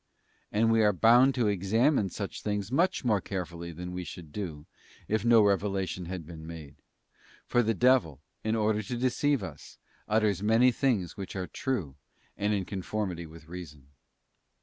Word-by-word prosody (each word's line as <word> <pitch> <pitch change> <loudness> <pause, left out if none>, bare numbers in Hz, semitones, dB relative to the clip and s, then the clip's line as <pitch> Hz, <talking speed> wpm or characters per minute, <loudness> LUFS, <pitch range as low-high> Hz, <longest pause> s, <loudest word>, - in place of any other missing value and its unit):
And 115 +2 +3
we 115 0 +4
are 105 -1 +4
bound 120 +7 +5
to 120 -4 +2
examine 105 - +2
such 100 +2 -5
things 105 0 -2
much 170 +1 +1
more 105 -5 +2
carefully 85 -3 -5
than 90 +2 -7
we 90 0 -4
should 85 -3 -9
do, 80 -6 -5 0.4
if 110 0 0
no 115 -2 +6
revelation 95 -2 0
had 90 -2 -6
been 80 -1 -10
made; 80 -4 -9 0.7
for 120 - +2
the 115 -1 +1
devil, 120 - +3 0.2
in 110 +1 0
order 105 -1 +1
to 120 +4 -4
deceive 130 0 +1
us, 80 -7 -9 0.3
utters 105 -3 +2
many 115 +4 +4
things 115 - 0
which 95 -1 -6
are 95 -1 -2
true 90 - -3 0.4
and 105 +1 0
in 100 -3 0
conformity 95 -3 -4
with 80 0 -14
reason. 75 -6 -10
100 Hz, 165 wpm, -29 LUFS, 90-115 Hz, 0.7 s, no